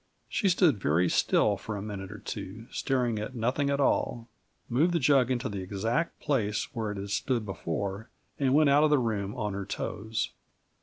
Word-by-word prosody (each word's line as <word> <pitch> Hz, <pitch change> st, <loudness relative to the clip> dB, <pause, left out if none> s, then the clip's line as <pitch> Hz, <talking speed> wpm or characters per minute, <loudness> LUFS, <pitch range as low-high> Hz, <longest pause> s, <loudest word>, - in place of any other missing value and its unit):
She 200 Hz, -, +1 dB
stood 165 Hz, -, +3 dB
very 85 Hz, +4 st, +3 dB
still 105 Hz, -2 st, +3 dB
for 105 Hz, +2 st, -5 dB
a -, -, -4 dB
minute 100 Hz, -2 st, -6 dB
or 105 Hz, -, -7 dB
two, 105 Hz, +2 st, -7 dB
staring 125 Hz, -5 st, 0 dB
at 105 Hz, +5 st, -5 dB
nothing 125 Hz, +5 st, 0 dB
at 140 Hz, 0 st, +1 dB
all; 120 Hz, -4 st, +1 dB, 0.4 s
moved 155 Hz, +9 st, +2 dB
the 170 Hz, -, +2 dB
jug 135 Hz, -3 st, +4 dB
into 130 Hz, 0 st, 0 dB
the 100 Hz, -2 st, -4 dB
exact 110 Hz, -, -1 dB
place 115 Hz, -3 st, -1 dB
where 110 Hz, -4 st, -2 dB
it 105 Hz, -, -5 dB
had 100 Hz, 0 st, -5 dB
stood 120 Hz, +1 st, 0 dB
before, 100 Hz, +3 st, -4 dB, 0.3 s
and 135 Hz, -1 st, +3 dB
went 150 Hz, -2 st, +5 dB
out 145 Hz, +2 st, +5 dB
of 155 Hz, -, +5 dB
the 150 Hz, -, +5 dB
room 105 Hz, -5 st, -1 dB
on 105 Hz, -4 st, -2 dB
her 100 Hz, 0 st, -3 dB
toes. 110 Hz, +2 st, -3 dB
115 Hz, 195 wpm, -29 LUFS, 100-135 Hz, 0.4 s, went